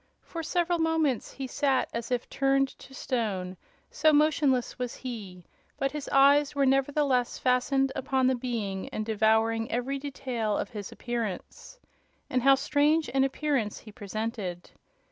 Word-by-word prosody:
For 335 Hz, -, -6 dB
several 345 Hz, +1 st, 0 dB
moments 320 Hz, -6 st, +1 dB
he 270 Hz, -, -5 dB
sat 265 Hz, 0 st, +1 dB
as 235 Hz, 0 st, -4 dB
if 245 Hz, -1 st, -1 dB
turned 275 Hz, 0 st, +2 dB
to -, -, -14 dB
stone, 210 Hz, -9 st, -2 dB, 0.4 s
so 310 Hz, +1 st, +4 dB
motionless 290 Hz, -5 st, +2 dB
was 250 Hz, -1 st, -3 dB
he; 200 Hz, -9 st, -8 dB, 0.3 s
but 275 Hz, 0 st, 0 dB
his 295 Hz, -1 st, -5 dB
eyes 280 Hz, +1 st, +5 dB
were 280 Hz, -1 st, +3 dB
nevertheless 270 Hz, -1 st, +2 dB
fastened 265 Hz, +2 st, +2 dB
upon 265 Hz, -1 st, 0 dB
the 260 Hz, -, +4 dB
Being 230 Hz, -6 st, -3 dB
and 215 Hz, -, -4 dB
devouring 220 Hz, +1 st, +2 dB
every 260 Hz, +4 st, -1 dB
detail 250 Hz, -6 st, -2 dB
of -, -, -3 dB
his 205 Hz, -2 st, -7 dB
appearance. 235 Hz, -, -5 dB, 0.5 s
And 255 Hz, -, +1 dB
how 270 Hz, +2 st, +6 dB
strange 295 Hz, +3 st, +2 dB
an 270 Hz, 0 st, +3 dB
appearance 270 Hz, -5 st, -1 dB
he 215 Hz, -, -12 dB
presented! 205 Hz, -4 st, -5 dB
260 Hz, 145 wpm, -28 LUFS, 225-280 Hz, 0.5 s, how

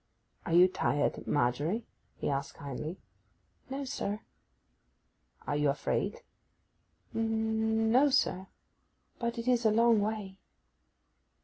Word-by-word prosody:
'Are 165 Hz, -, -1 dB
you 175 Hz, +2 st, +8 dB
tired, 145 Hz, -5 st, -1 dB
Margery?' 145 Hz, -, 0 dB, 0.3 s
he -, -, -4 dB
asked 140 Hz, 0 st, -2 dB
kindly. 145 Hz, +5 st, -5 dB, 0.7 s
'No, 275 Hz, +1 st, -3 dB
sir.' 210 Hz, -5 st, -3 dB, 1.2 s
'Are 145 Hz, -, -1 dB
you 150 Hz, 0 st, +2 dB
afraid?' 150 Hz, -, -1 dB, 0.9 s
'N—no, 225 Hz, +3 st, +2 dB
sir. 190 Hz, -8 st, +1 dB, 0.7 s
But 235 Hz, 0 st, -2 dB
it 230 Hz, +1 st, -4 dB
is 245 Hz, -2 st, +3 dB
a 220 Hz, -, +5 dB
long 230 Hz, +1 st, +4 dB
way. 205 Hz, -2 st, -3 dB
220 Hz, 105 wpm, -31 LUFS, 160-230 Hz, 1.2 s, you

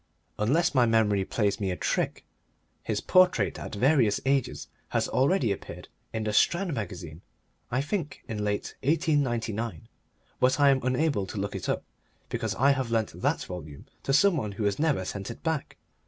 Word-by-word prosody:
Unless 140 Hz, +13 st, +2 dB
my 125 Hz, -3 st, +4 dB
memory 105 Hz, -3 st, +3 dB
plays 105 Hz, +1 st, 0 dB
me 100 Hz, -2 st, -1 dB
a 90 Hz, -, -1 dB
trick, -, -, -1 dB, 0.6 s
his -, -, -2 dB
portrait 180 Hz, -, +3 dB
at -, -, -6 dB
various 125 Hz, -2 st, +3 dB
ages 135 Hz, -2 st, 0 dB, 0.2 s
has -, -, 0 dB
already 135 Hz, -, +2 dB
appeared 100 Hz, -, -6 dB, 0.2 s
in 110 Hz, -, -2 dB
The 105 Hz, 0 st, -1 dB
Strand 175 Hz, -, +2 dB
Magazine 90 Hz, -, -6 dB, 0.5 s
I 125 Hz, +2 st, 0 dB
think 150 Hz, -2 st, -3 dB
late 105 Hz, -3 st, -2 dB
in -, -, -7 dB
1899; 120 Hz, -, 0 dB, 0.5 s
but 130 Hz, +3 st, +3 dB
I 140 Hz, -1 st, +6 dB
am 135 Hz, -1 st, +2 dB
unable 130 Hz, -5 st, 0 dB
to 105 Hz, -, -7 dB
look 100 Hz, +1 st, -3 dB
it -, -, -4 dB
up -, -, 0 dB, 0.5 s
because 110 Hz, -4 st, -2 dB
I 135 Hz, +6 st, +4 dB
have 130 Hz, -3 st, -1 dB
lent 115 Hz, -2 st, -1 dB
that -, -, +1 dB
volume 80 Hz, -6 st, -8 dB, 0.2 s
to -, -, -2 dB
some 175 Hz, +5 st, +5 dB
one 105 Hz, -7 st, -3 dB
who 105 Hz, -, -4 dB
has 100 Hz, -1 st, 0 dB
never 145 Hz, -12 st, +1 dB
sent 100 Hz, +2 st, -5 dB
it 115 Hz, -, -9 dB
back. 160 Hz, -3 st, -2 dB
115 Hz, 175 wpm, -28 LUFS, 100-140 Hz, 0.6 s, I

